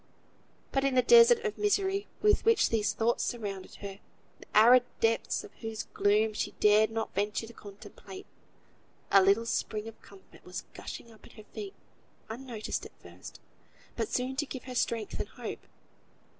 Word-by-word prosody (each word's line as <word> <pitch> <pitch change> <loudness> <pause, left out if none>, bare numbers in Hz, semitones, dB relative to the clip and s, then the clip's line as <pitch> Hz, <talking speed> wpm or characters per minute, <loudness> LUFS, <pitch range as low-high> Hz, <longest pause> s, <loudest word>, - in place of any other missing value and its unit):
But, 270 - 0
in 275 -1 +1
the 255 - +4
desert 470 0 +7
of 425 - -3
misery 400 -1 +1 0.2
with 420 0 +4
which 450 -2 +4
these 215 -2 +1
thoughts 230 +1 0
surrounded 200 -6 -5
her, 200 -1 -8 0.4
the - - -4
arid 245 +4 +8 0.2
depths 225 - 0
of 415 - -13
whose 225 -1 -4
gloom 215 +2 +2
she - - -3
dared 210 +1 +5
not 225 0 -4
venture 205 +3 -1
to 230 - -13
contemplate, 210 - -12 0.9
a 195 - +7
little 200 +4 +3
spring 215 -1 -2
of 225 - -11
comfort 195 -1 -18
was 180 +2 -7
gushing 235 - -9
up 220 - -19
at - - -18
her 215 - -13
feet, 395 - -9 0.5
unnoticed 235 -1 -5
at - - -13
first, - - -12 0.6
but 435 - -2
soon 255 +1 -2
to 295 0 -1
give 260 - -7
her 255 - -8
strength 230 -3 -2
and - - -4
hope. - - -8
230 Hz, 170 wpm, -30 LUFS, 210-275 Hz, 0.9 s, arid